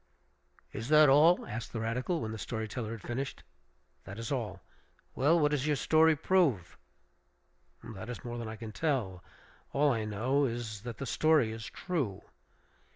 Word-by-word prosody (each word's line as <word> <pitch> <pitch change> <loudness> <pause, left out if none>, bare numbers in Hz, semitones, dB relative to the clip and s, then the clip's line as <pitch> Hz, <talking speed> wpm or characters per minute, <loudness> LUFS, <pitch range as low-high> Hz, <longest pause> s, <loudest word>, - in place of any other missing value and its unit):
"Is 115 +4 -5
that 155 -1 +7
all?" 155 +6 +5
asked 115 +2 -6
the 115 - -3
radical, 125 +9 -1
when 110 - -3
the 110 - -6
story 110 0 -4
teller 110 0 -5
had 115 -2 -7
finished. 135 +3 -4 0.6
"That 95 - -8
is 115 +2 -5
all." 110 -8 -3 0.5
"Well, 155 +6 +3
what 150 -1 +3
does 145 -1 0
your 150 - +2
story 160 +3 +4
prove?" 140 - +1 1.1
"That 110 -1 -8
is 125 - -7
more 120 0 -5
than 115 - -5
I 110 - -6
can 110 -1 -8
tell. 110 - -2 0.5
All 145 +1 +3
I 110 -3 -1
know 125 +7 +1
is 115 -4 -4
that 120 0 -7
the 140 - -5
story 155 -6 +3
is 110 -1 -7
true." 140 - -3
120 Hz, 170 wpm, -31 LUFS, 110-145 Hz, 1.1 s, that